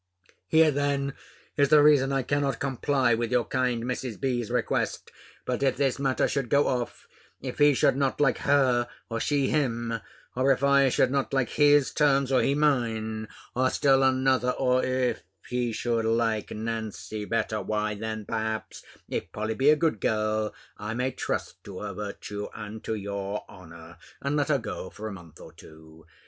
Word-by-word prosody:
Here 160 Hz, +6 st, +5 dB
then 140 Hz, -1 st, -1 dB, 0.4 s
is 140 Hz, -1 st, +4 dB
the 150 Hz, -1 st, +7 dB
reason 140 Hz, -3 st, +5 dB
I 135 Hz, -1 st, 0 dB
cannot 140 Hz, -1 st, 0 dB
comply 135 Hz, -1 st, +1 dB
with 115 Hz, 0 st, -1 dB
your 125 Hz, -1 st, +2 dB
kind 125 Hz, -3 st, 0 dB
Mrs. 125 Hz, -2 st, -4 dB
B.'s 125 Hz, -4 st, -1 dB
request. -, -, -1 dB, 0.3 s
But 125 Hz, +1 st, -2 dB
if 135 Hz, -2 st, +1 dB
this 135 Hz, -1 st, +1 dB
matter 135 Hz, -2 st, +1 dB
should 135 Hz, -4 st, -2 dB
go 140 Hz, 0 st, +4 dB
off; 125 Hz, -2 st, -3 dB, 0.3 s
if -, -, -6 dB
he 145 Hz, -1 st, +6 dB
should 130 Hz, -, +3 dB
not 135 Hz, -1 st, 0 dB
like 145 Hz, -2 st, +2 dB
her, 130 Hz, -4 st, +2 dB, 0.2 s
or 115 Hz, -, -1 dB
she 140 Hz, +1 st, +1 dB
him; 120 Hz, -6 st, -1 dB, 0.4 s
or 130 Hz, +2 st, +3 dB
if 135 Hz, 0 st, +1 dB
I 140 Hz, -1 st, +5 dB
should 130 Hz, +1 st, +2 dB
not 140 Hz, 0 st, -1 dB
like 135 Hz, -2 st, +1 dB
his 145 Hz, -2 st, +4 dB
terms, 140 Hz, -3 st, +2 dB
or 130 Hz, -, +4 dB
he 140 Hz, -, +1 dB
mine; 115 Hz, -7 st, 0 dB, 0.3 s
or 130 Hz, +1 st, +2 dB
still 135 Hz, 0 st, +3 dB
another 130 Hz, -1 st, +2 dB
or, 130 Hz, -1 st, +1 dB
if 130 Hz, -1 st, 0 dB, 0.3 s
he 125 Hz, -1 st, -1 dB
should 115 Hz, 0 st, -1 dB
like 115 Hz, -2 st, 0 dB
Nancy 110 Hz, -1 st, -5 dB
better 110 Hz, -1 st, -1 dB
why, 105 Hz, 0 st, -1 dB
then 110 Hz, 0 st, -5 dB
perhaps, 110 Hz, 0 st, -3 dB, 0.3 s
if 80 Hz, -, -4 dB
Polly 110 Hz, +1 st, -2 dB
be 135 Hz, +5 st, +3 dB
a 155 Hz, -, +7 dB
good 155 Hz, -, 0 dB
girl, 110 Hz, 0 st, 0 dB, 0.3 s
I 105 Hz, +2 st, -4 dB
may 125 Hz, +2 st, 0 dB
trust -, -, -4 dB
to 100 Hz, -2 st, -8 dB
her 105 Hz, -1 st, -5 dB
virtue, 105 Hz, +1 st, -6 dB
and 105 Hz, +1 st, -8 dB
to 110 Hz, -, -1 dB
your 100 Hz, 0 st, -4 dB
honour, 85 Hz, -1 st, -13 dB, 0.2 s
and 140 Hz, +1 st, -2 dB
let 145 Hz, 0 st, 0 dB
her 145 Hz, -, +4 dB
go 110 Hz, -5 st, -6 dB
for 110 Hz, -, -7 dB
a 105 Hz, -, -5 dB
month 85 Hz, -5 st, -13 dB
or -, -, -12 dB
two. 80 Hz, 0 st, -16 dB
125 Hz, 180 wpm, -27 LUFS, 110-135 Hz, 0.4 s, the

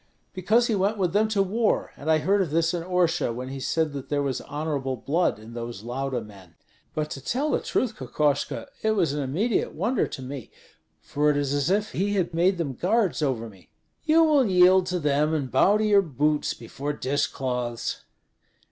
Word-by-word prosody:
"Because 215 Hz, +6 st, +2 dB
he 235 Hz, -, 0 dB
went 205 Hz, +2 st, +1 dB
with 180 Hz, -3 st, 0 dB
them 215 Hz, +2 st, +3 dB
to 210 Hz, -2 st, +2 dB
war, 215 Hz, +4 st, 0 dB
and 150 Hz, -, -6 dB
I 160 Hz, -, +5 dB
heard 195 Hz, +6 st, +2 dB
of 180 Hz, -, -1 dB
this 165 Hz, +2 st, +1 dB
in 175 Hz, -, -2 dB
Orsha, 175 Hz, -6 st, +1 dB
when 125 Hz, +2 st, -6 dB
he 135 Hz, 0 st, -6 dB
said 155 Hz, +2 st, 0 dB
that 140 Hz, -2 st, -7 dB
there 145 Hz, -1 st, 0 dB
was 135 Hz, -2 st, -2 dB
honorable 145 Hz, -3 st, -3 dB
blood 155 Hz, -, 0 dB
in 110 Hz, +2 st, -12 dB
those 115 Hz, -3 st, -6 dB
Lauda 130 Hz, +1 st, -3 dB
men. 95 Hz, -6 st, -14 dB, 0.4 s
But 155 Hz, 0 st, -2 dB
to 135 Hz, -, -6 dB
tell 280 Hz, -, -1 dB
the -, -, +2 dB
truth, 235 Hz, -3 st, -1 dB
Kokoshko, 140 Hz, -, -1 dB, 0.2 s
it 220 Hz, -, +2 dB
was 175 Hz, -9 st, +1 dB
an 145 Hz, -, -2 dB
immediate 175 Hz, -, -1 dB
wonder 245 Hz, -1 st, 0 dB
to -, -, -7 dB
me, 130 Hz, -2 st, -7 dB, 0.5 s
for 150 Hz, +1 st, +1 dB
it 145 Hz, -, +2 dB
is 140 Hz, -1 st, 0 dB
as 145 Hz, +2 st, 0 dB
if 210 Hz, +3 st, +1 dB
he 205 Hz, +2 st, -1 dB
had 180 Hz, -3 st, 0 dB
made 180 Hz, +3 st, +2 dB
them 155 Hz, -6 st, -2 dB
guards 195 Hz, -, +1 dB
over 130 Hz, -6 st, -1 dB
me." 95 Hz, -4 st, -17 dB, 0.3 s
"You 325 Hz, +1 st, +5 dB
will 295 Hz, -6 st, +4 dB
yield 185 Hz, 0 st, +5 dB
to 180 Hz, -, -1 dB
them 150 Hz, 0 st, +1 dB
and 135 Hz, -5 st, -3 dB
bow 195 Hz, +11 st, +4 dB
to 215 Hz, -, 0 dB
your 205 Hz, -2 st, +5 dB
boots 150 Hz, -2 st, 0 dB
before 140 Hz, +5 st, -5 dB
dish 140 Hz, 0 st, 0 dB
cloths." 125 Hz, -3 st, -3 dB
155 Hz, 205 wpm, -25 LUFS, 135-195 Hz, 0.5 s, I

